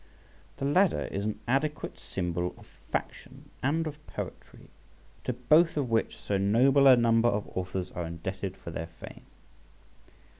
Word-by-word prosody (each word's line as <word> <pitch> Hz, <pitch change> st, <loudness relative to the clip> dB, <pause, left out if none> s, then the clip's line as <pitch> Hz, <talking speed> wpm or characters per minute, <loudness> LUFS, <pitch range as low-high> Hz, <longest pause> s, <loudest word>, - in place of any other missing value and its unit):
The 135 Hz, -, -3 dB
Ladder 180 Hz, +6 st, +3 dB
is 100 Hz, +1 st, -2 dB
an 105 Hz, -1 st, -2 dB
adequate 150 Hz, +4 st, -1 dB
symbol 90 Hz, -1 st, -3 dB
of -, -, -15 dB, 0.3 s
faction -, -, -5 dB
and 155 Hz, +5 st, +1 dB
of 150 Hz, -1 st, -7 dB
poetry, -, -, -8 dB, 0.5 s
to 125 Hz, -, 0 dB
both 155 Hz, +8 st, +4 dB
of 130 Hz, -5 st, -1 dB
which 115 Hz, -, +1 dB
so 100 Hz, -1 st, -1 dB
noble 130 Hz, +8 st, +5 dB
a 130 Hz, -, +10 dB
number 115 Hz, 0 st, +4 dB
of 105 Hz, -2 st, -1 dB
authors 95 Hz, 0 st, -3 dB
are 85 Hz, -1 st, -4 dB
indebted 95 Hz, +3 st, -5 dB
for 85 Hz, -, -8 dB
their 80 Hz, 0 st, -4 dB
fame. 80 Hz, -, -12 dB
115 Hz, 150 wpm, -29 LUFS, 95-140 Hz, 0.5 s, a